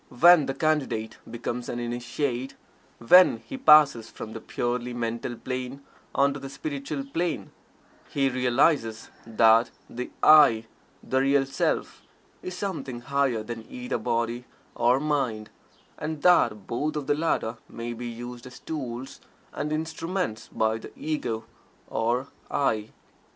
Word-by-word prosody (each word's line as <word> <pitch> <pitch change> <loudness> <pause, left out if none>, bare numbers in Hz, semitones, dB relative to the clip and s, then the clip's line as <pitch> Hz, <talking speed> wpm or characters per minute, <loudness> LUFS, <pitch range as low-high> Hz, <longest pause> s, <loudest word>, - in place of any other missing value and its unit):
When 160 +2 +6
the 135 - -2
Candidate 140 -8 -1
becomes 120 +1 -4
an 120 - -3
Initiate 120 +2 -3 0.4
when 180 +11 +6
he 270 - -7
passes 150 - +6
from 110 - -8
the 115 - -7
purely 120 0 -2
Mental 120 +1 -3
Plane 130 +3 -5 0.3
on 140 0 +3
to 140 - -6
the 135 0 -7
Spiritual 140 0 -4
Plane 165 +4 -2 0.6
he 140 -1 +1
realizes 125 -2 +1 0.2
that 115 +1 +5 0.2
the 125 +1 -6
"I," 145 -8 +7 0.4
the 130 - 0
Real 135 0 +3
Self 135 +1 -1 0.4
is 185 0 -6
something 160 -12 -4
higher 135 -4 0
than 115 0 -7
either 250 -1 -4
body 115 +1 -1 0.3
or 120 +2 +3
mind, 135 -8 -1 0.5
and 155 -1 -4
that 105 - +4
both 145 +9 -2
of 150 -2 -3
the - - +2
latter 145 -7 -1
may 115 +1 -5
be 120 +1 -6
used 120 +1 -7
as 125 - -12
tools 135 -3 -6 0.3
and 150 - -3
instruments 160 - -3
by 110 0 0
the - - -10
Ego 120 -8 -3 0.4
or 120 +3 0 0.2
"I." 110 -6 0
125 Hz, 135 wpm, -26 LUFS, 115-150 Hz, 0.6 s, I